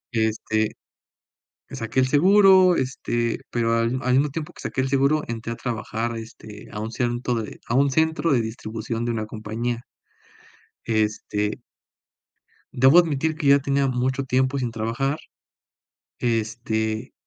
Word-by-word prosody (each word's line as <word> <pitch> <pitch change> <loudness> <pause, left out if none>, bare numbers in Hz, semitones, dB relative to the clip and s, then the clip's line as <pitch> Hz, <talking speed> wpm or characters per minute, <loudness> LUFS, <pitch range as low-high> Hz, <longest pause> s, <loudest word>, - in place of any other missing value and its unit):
Este, 110 -1 0 1.0
saqué 115 +3 -4
el 130 - +3
seguro, 185 +4 +6
este, 120 -3 -1
pero 115 -1 +1
al 115 +2 +1
al 125 0 +1
mismo 140 +3 +3
tiempo 150 +1 -5
que - - -12
saqué - - -2
el 130 - -1
seguro 140 +3 +2
entré 115 0 -4
a - - -5
trabajar, 115 -1 -3
este, 110 -2 -10
a 105 - -6
un 110 +1 -4
centro 120 0 -1
de 105 - -9
a 115 - -2
un 140 +2 +4
centro 160 +2 +1
de 125 - +3
distribución 115 +1 -4
de 120 - -1
una 110 -2 -3
compañía. 115 +3 -4 1.0
Este 105 -1 -1 1.1
debo 130 +6 +6
admitir 160 -2 +1
que 155 -1 -5
ya 140 0 +7
tenía 140 0 +1
mucho 130 +2 0
tiempo 130 +1 +1
sin 125 -3 -2
trabajar, 115 +6 -1 1.0
este, 110 0 -1
120 Hz, 145 wpm, -23 LUFS, 115-135 Hz, 1.1 s, ya